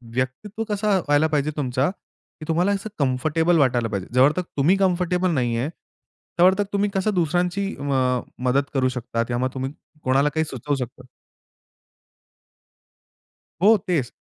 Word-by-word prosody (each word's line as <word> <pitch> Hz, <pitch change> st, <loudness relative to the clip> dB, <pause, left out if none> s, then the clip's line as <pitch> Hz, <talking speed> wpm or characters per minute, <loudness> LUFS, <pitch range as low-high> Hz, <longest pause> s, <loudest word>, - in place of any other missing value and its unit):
व्यक्तित्व 190 Hz, -, -3 dB
कसं 205 Hz, -1 st, +1 dB
व्हायला 145 Hz, +2 st, +4 dB
पाहिजे 150 Hz, 0 st, 0 dB
तुमचा, 130 Hz, +2 st, 0 dB
की 175 Hz, -4 st, -15 dB
तुम्हाला 175 Hz, +5 st, +2 dB
असं 200 Hz, +2 st, -2 dB
कम्फर्टेबल 155 Hz, +6 st, +2 dB
वाटायला 120 Hz, -4 st, +2 dB
पाहिजे. 100 Hz, -3 st, -4 dB
जोपर्यंत 140 Hz, +8 st, +4 dB, 0.2 s
तुम्ही 160 Hz, +8 st, +4 dB
कम्फर्टेबल 180 Hz, -1 st, +1 dB
नाहीये, 120 Hz, -1 st, 0 dB, 0.7 s
तोपर्यंत 190 Hz, +3 st, +5 dB
तुम्ही 200 Hz, 0 st, +1 dB
कसं 200 Hz, +2 st, +1 dB
दुसऱ्यांची 180 Hz, +3 st, 0 dB
अ, 130 Hz, -3 st, +1 dB, 0.3 s
मदत 140 Hz, +2 st, +1 dB
करू 130 Hz, -1 st, +2 dB
शकता 115 Hz, -1 st, -2 dB
या 120 Hz, -, -1 dB
मग 130 Hz, +1 st, 0 dB
तुम्ही 130 Hz, +1 st, -3 dB, 0.3 s
कोणाला 135 Hz, +3 st, +3 dB
काही 160 Hz, -, +2 dB
सुचवू 145 Hz, +1 st, -3 dB
शकता. 130 Hz, 0 st, -6 dB, 2.6 s
हो, 215 Hz, +2 st, +6 dB
तेच. 150 Hz, -9 st, 0 dB
150 Hz, 135 wpm, -23 LUFS, 130-180 Hz, 2.6 s, हो